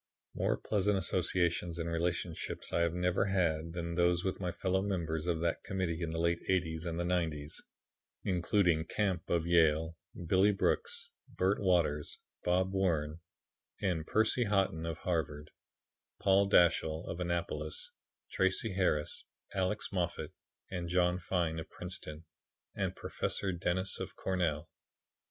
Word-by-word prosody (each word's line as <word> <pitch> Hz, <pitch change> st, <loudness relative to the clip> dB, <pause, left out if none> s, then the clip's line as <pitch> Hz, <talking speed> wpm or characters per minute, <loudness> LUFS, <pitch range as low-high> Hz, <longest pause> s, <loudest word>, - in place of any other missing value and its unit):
"More -, -, +1 dB
pleasant 105 Hz, -1 st, +1 dB
associations 85 Hz, -2 st, +2 dB
and 85 Hz, -1 st, -2 dB
relationships 85 Hz, 0 st, -2 dB
I -, -, +3 dB
have 85 Hz, 0 st, +1 dB
never 90 Hz, 0 st, +2 dB
had 85 Hz, -4 st, +1 dB
than 85 Hz, -1 st, -3 dB
those 85 Hz, 0 st, +3 dB
with 95 Hz, -, -2 dB
my 90 Hz, -2 st, -1 dB
fellow 95 Hz, +2 st, 0 dB
members 85 Hz, -5 st, -2 dB
of 85 Hz, -2 st, 0 dB
that 85 Hz, -1 st, 0 dB
Committee 90 Hz, -4 st, -2 dB
in 85 Hz, -, -1 dB
the 80 Hz, -, -3 dB
late 85 Hz, +1 st, +2 dB
'80's 85 Hz, -3 st, 0 dB
and 85 Hz, 0 st, -2 dB
the -, -, +1 dB
'90's, 80 Hz, -4 st, -1 dB, 0.6 s
including 90 Hz, -3 st, +2 dB
Camp 95 Hz, -2 st, -1 dB
of 85 Hz, -1 st, +1 dB
Yale; 80 Hz, -1 st, +3 dB, 0.3 s
Billy 95 Hz, +5 st, +5 dB
Brooks, 470 Hz, -, -1 dB, 0.2 s
Bert 95 Hz, +3 st, +1 dB
Waters, 85 Hz, -6 st, +1 dB, 0.3 s
Bob 95 Hz, +2 st, +2 dB
Wrenn 80 Hz, -5 st, 0 dB, 0.6 s
and 85 Hz, -5 st, -1 dB
Percy 110 Hz, +3 st, +2 dB
Haughton 95 Hz, -5 st, +1 dB
of 80 Hz, -1 st, -3 dB
Harvard; 75 Hz, -4 st, -2 dB, 0.7 s
Paul 100 Hz, +1 st, +4 dB
Dashiell 80 Hz, -3 st, +4 dB
of 85 Hz, -, -4 dB
Annapolis; 85 Hz, -3 st, -3 dB, 0.4 s
Tracy 95 Hz, +3 st, +1 dB
Harris, 80 Hz, -6 st, 0 dB, 0.3 s
Alex 95 Hz, +2 st, -1 dB
Moffat 90 Hz, -4 st, -2 dB, 0.4 s
and 90 Hz, -2 st, -3 dB
John 90 Hz, 0 st, +2 dB
Fine 85 Hz, -3 st, -1 dB
of 80 Hz, -, -7 dB
Princeton; 85 Hz, -3 st, -6 dB, 0.5 s
and -, -, -2 dB
Professor 95 Hz, -, -2 dB
Dennis 90 Hz, +2 st, -1 dB
of -, -, -5 dB
Cornell. 85 Hz, -5 st, -1 dB
85 Hz, 140 wpm, -33 LUFS, 80-95 Hz, 0.7 s, Billy